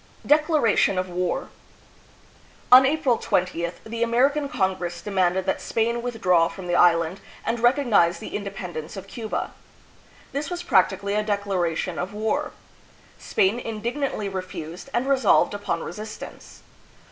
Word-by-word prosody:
Declaration 295 - +3
of 185 0 -1
War. 180 0 -2 1.2
On 260 +1 +9
April 275 -5 +1
20th 170 -1 -1
the 230 +1 -5
American 275 +5 +2
Congress 185 -6 -1
demanded 185 -1 0
that 190 - -1
Spain 235 +1 0
withdraw 185 -9 +2
from 190 +1 -9
the 175 - -2
island 175 +1 +3 0.2
and 230 +1 -1
recognize 240 -9 +3
the - - -7
independence 190 -5 -6
of 195 - -7
Cuba. 220 +2 -4 0.8
This 285 +2 -3
was 350 -1 -4
prac 185 - +4
tically 200 +1 -4
a 210 - +2
declaration 190 -5 -1
of 185 +3 -4
war. 220 +8 -1 0.7
Spain 200 +5 +1
indignantly 230 0 -3
refused, 185 - -6
and 245 +1 -1
resolved 265 -8 +3
upon 205 -5 -3
resistance. 215 +4 -9
205 Hz, 130 wpm, -24 LUFS, 180-240 Hz, 1.2 s, On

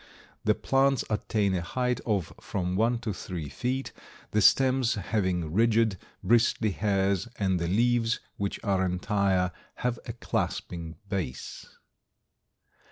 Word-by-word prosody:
The - - +3
plants 135 -1 +2
attain 105 -2 +1
a 90 - 0
height 125 +7 -1
of 100 -7 0
from 90 -2 -2
one 115 +4 +2
to 110 -3 -2
three 90 -5 -5
feet, 130 - -3 0.4
the 105 - +2
stems 130 +2 +4
having 95 -5 -1
rigid, 110 -2 +3 0.2
bristly 115 -2 +3
hairs 100 -1 +1
and 95 -3 +1
the 85 - -1
leaves, 115 +4 +2 0.2
which 100 -1 -3
are 95 -3 +2
entire, 95 0 +1 0.2
have 125 -1 -2
a - - -4
clasping 85 -2 -3
base. 90 -11 -4
100 Hz, 125 wpm, -28 LUFS, 90-115 Hz, 0.4 s, stems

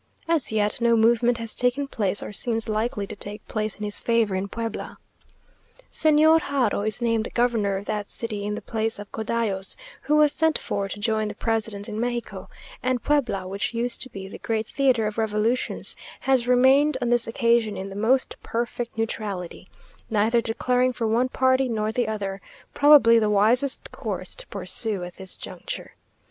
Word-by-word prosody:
As 325 -8 +1
yet, 210 +1 0
no 235 0 +4
movement 235 +1 +3
has 230 -2 -4
taken 250 +3 0
place 205 -6 -1
or - - -6
seems 225 +1 0
likely 215 0 -1
to 210 - -8
take 205 +1 -7
place 215 -1 -2
in 210 - -8
his 205 -1 -1
favour 230 -4 +1
in 190 +1 -1
Puebla. 225 +1 -5 0.9
Señor 315 +1 +5
Haro 260 -9 0
is 215 +3 -2
named 230 -2 +1
governor 225 -5 +1
of 200 - -7
that 210 -1 -3
city 215 -3 -3
in 210 0 -2
the - - -7
place 225 0 -2
of 205 -1 -10
Codallos, 220 -3 -1 0.3
who 300 - +1
was 300 -1 +5
sent 320 0 +2
for 200 -1 -3
to 200 - -5
join 215 0 0
the 210 - -6
president 220 -2 -2
in 215 - -5
Mexico; 240 0 -4 0.3
and 255 -2 -1
Puebla, 245 -11 0
which 200 +4 -3
used 240 +1 -1
to 260 - -1
be 195 -4 -8
the - - -10
great 220 -1 -1
theatre 255 -3 +1
of 215 +1 -3
revolutions, 220 +3 0 0.3
has 260 -3 +2
remained 265 +3 +5
on 245 -2 -1
this 240 -1 +3
occasion 230 -2 +1
in 195 +1 -5
the - - -8
most 245 +6 +2
perfect 235 0 -4
neutrality, 205 -6 -4 0.4
neither 225 +2 +2
declaring 250 +3 +1
for 235 - -3
one 235 +4 +2
party 260 0 +2
nor 215 -1 -1
the 240 0 0
other; 200 -3 -4 0.3
probably 285 -6 +7
the 215 -1 +1
wisest 230 +7 +2
course - - -4
to - - -8
pursue 210 -5 -2
at 175 0 -9
this 190 -1 -3
juncture. - - -7
225 Hz, 180 wpm, -24 LUFS, 210-245 Hz, 0.9 s, probably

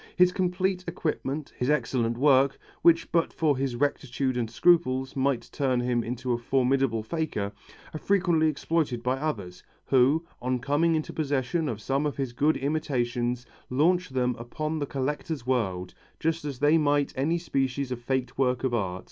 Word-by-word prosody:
His 180 0 +5
complete 185 0 0
equipment, 155 -4 -3
his 125 - 0
excellent 120 -5 +1
work, 135 0 +4 0.2
which 165 -1 +4
but 170 -1 +2
for 155 -3 +1
his 130 -2 -2
rectitude 135 -1 -1
and 120 -2 -1
scruples 130 -2 +2
might 135 -2 0
turn 130 -3 0
him 120 -1 0
into 125 +1 -2
a 120 - -1
formidable 130 -2 +1
faker, 110 -7 -2 0.4
are 155 - -4
frequently 175 -5 +2
exploited 150 -5 -1
by 130 +1 +1
others, 105 -13 -4 0.2
who, 135 +5 +3 0.2
on 125 +1 0
coming 145 +6 +1
into 155 - -3
possession 145 +1 -1
of 110 -3 -4
some 135 +6 0
of 145 - -4
his 135 -4 -3
good 150 +6 +2
imitations 125 -4 -1 0.2
launch 175 +7 +2
them 125 -2 0
upon 155 +6 -3
the 145 - -2
collector 145 +4 -2
world, 95 -8 -1 0.3
just 165 -1 -1
as 140 -3 -4
they 145 +4 +4
might 145 -1 +1
any 150 +6 +1
species 135 -5 -1
of 125 -1 -4
faked 130 +1 -2
works 125 -1 +1
of 130 -2 0
art. 95 -5 -1
135 Hz, 165 wpm, -27 LUFS, 125-155 Hz, 0.4 s, His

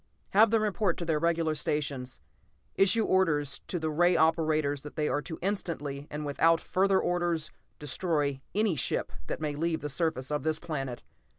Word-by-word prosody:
"Have 215 +3 +6
them 220 0 +2
report 205 -3 0
to 170 - -4
their 160 -2 +1
regular 165 -1 +1
stations. 140 - -2 0.5
Issue 210 +3 +4
orders 150 -8 +1
to 180 - -2
the 160 -2 -2
ray 175 +3 +3
operators 155 -3 +2
that 150 - -10
they 150 -1 0
are 145 - 0
to 160 +1 -7
instantly, 150 -8 -3
and 150 0 -5
without 165 +3 +3
further 190 +2 +2
orders, 175 -3 -1 0.3
destroy 145 -2 -1
any 210 -4 +2
ship 130 - -1 0.2
that - - -3
may 150 -2 -2
leave 160 +1 -1
the 150 - -4
surface 140 -2 -1
of 150 - 0
this 155 0 0
planet. 135 -7 -5
160 Hz, 175 wpm, -29 LUFS, 145-175 Hz, 0.5 s, Have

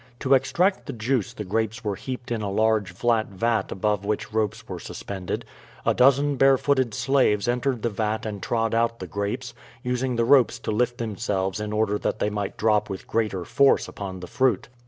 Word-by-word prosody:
To 135 - +3
extract 175 +9 +2
the 140 - -4
juice 120 0 -1
the 110 - -6
grapes 110 +4 -2
were 105 -2 -1
heaped 125 +4 -6
in 115 -2 -1
a 100 - -2
large 110 -2 +1
flat 110 +4 +1
vat 115 +4 -1
above 105 +1 0
which 105 +1 -3
ropes 110 -2 -1
were - - -6
suspended. 95 -3 -5 0.4
A - - +3
dozen 140 +2 +4
barefooted 135 -2 +3
slaves 125 -5 +2
entered 125 -1 0
the 120 - +2
vat 110 +1 -2
and 105 -3 -5
trod 115 -1 0
out 115 0 +1
the 95 - -6
grapes, 100 +4 -4 0.3
using 125 0 -1
the 115 0 +2
ropes 130 -1 +5
to - - -2
lift 120 +3 0
themselves 105 -4 -2
in 105 0 -4
order 105 -1 +1
that - - -1
they 105 - 0
might 105 -1 -3
drop 105 -1 +2
with 95 - -6
greater 105 -6 -1
force 140 +8 +3
upon 95 -2 -7
the - - -6
fruit. 130 -4 +1
110 Hz, 195 wpm, -25 LUFS, 105-125 Hz, 0.4 s, ropes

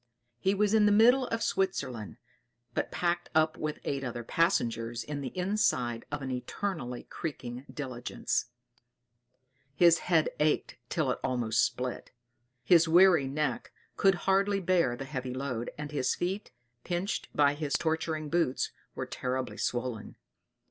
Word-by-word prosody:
He 195 +8 +2
was 210 +1 +2
in 215 -1 +5
the - - +4
middle 245 +5 +5
of 230 0 -2
Switzerland, 130 - -1 0.6
but - - -1
packed 175 0 -1
up 155 0 +3
with 155 -1 -3
eight 140 -1 -2
other 120 -2 -4
passengers 115 - 0
in 145 -1 -5
the 135 - -3
inside 180 - 0
of 145 -1 -3
an 130 - -3
eternally 125 +1 -4
creaking 130 -4 -6
diligence; 125 -4 -2 1.3
his 170 -1 +6
head 165 -3 +2
ached 150 0 +1
till 150 -6 +1
it - - -3
almost 120 -4 +1
split, 125 0 -2 0.5
his 170 +3 +5
weary 175 -4 +6
neck 150 +3 -2 0.2
could 195 -1 +4
hardly 195 +1 +3
bear 175 -9 +2
the 135 - -6
heavy 130 -3 -4
load, 130 -3 -3
and 150 0 -5
his 140 -4 0
feet, 190 +4 -3 0.3
pinched 180 +3 -2
by 145 -1 +4
his 145 -1 -3
torturing 160 0 -1
boots, 165 -5 0 0.2
were - - -3
terribly 130 -4 -3
swollen. 120 -2 -3
150 Hz, 140 wpm, -30 LUFS, 125-180 Hz, 1.3 s, his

